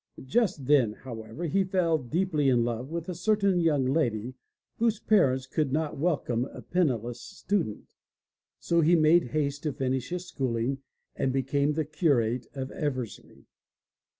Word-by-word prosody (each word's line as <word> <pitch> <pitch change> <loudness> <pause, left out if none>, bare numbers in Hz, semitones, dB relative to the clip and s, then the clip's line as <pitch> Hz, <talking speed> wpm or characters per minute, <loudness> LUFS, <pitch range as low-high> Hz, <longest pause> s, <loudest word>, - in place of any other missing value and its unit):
Just 195 - 0
then, 130 -6 +4
however, 115 +4 -8
he 190 +5 +2
fell 180 -4 +1
deeply 150 +2 0
in 120 -2 +3
love 120 +2 -3
with 170 0 -4
a 180 - -3
certain 200 +1 +2
young 150 -6 +2
lady 125 -4 0 0.4
whose 225 -2 +1
parents 130 -11 +3
could 140 +1 -1
not 155 +1 -1
welcome 140 -7 0
a - - -10
penniless 120 - -1
student. 180 - -3 0.7
So 170 0 +2
he 165 +3 +5
made 165 +2 +5
haste 145 +1 -2
to 155 - -1
finish 130 -1 -2
his 180 0 -4
schooling 130 -3 -2 0.4
and 130 - 0
became 140 +3 +1
the 155 0 -1
curate 130 -7 +1
of 130 -1 -4
Eversley. 130 -7 -5
145 Hz, 150 wpm, -28 LUFS, 130-170 Hz, 0.7 s, he